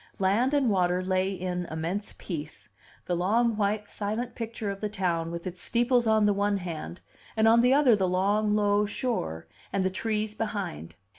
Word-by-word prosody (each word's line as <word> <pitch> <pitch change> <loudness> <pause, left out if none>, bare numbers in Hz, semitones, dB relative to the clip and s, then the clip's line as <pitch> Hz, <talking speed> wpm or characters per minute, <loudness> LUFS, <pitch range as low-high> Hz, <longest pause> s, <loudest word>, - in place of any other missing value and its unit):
Land 220 +9 +2
and 265 -6 +3
water 180 -1 +1
lay 185 +1 +1
in 180 -2 -3
immense 170 +6 -4
peace; 150 - -7 0.4
the 180 - -1
long, 220 +6 +2
white, 210 0 0
silent 220 +4 -3
picture 225 -3 -4
of 195 - -7
the 210 - -1
town 175 -5 -1
with 170 0 -6
its 180 -1 -6
steeples 240 0 +2
on 220 -1 +4
the 205 - +4
one 200 0 +1
hand, 175 -1 -6 0.4
and 220 0 +4
on 230 +1 +6
the 250 +2 +4
other 275 -6 +5
the 190 -2 +1
long, 205 +3 +2
low 205 0 +2
shore, 80 - -3 0.3
and 195 -1 0
the 190 - +1
trees 215 +2 -2
behind. 200 - -4
205 Hz, 180 wpm, -27 LUFS, 180-220 Hz, 0.4 s, on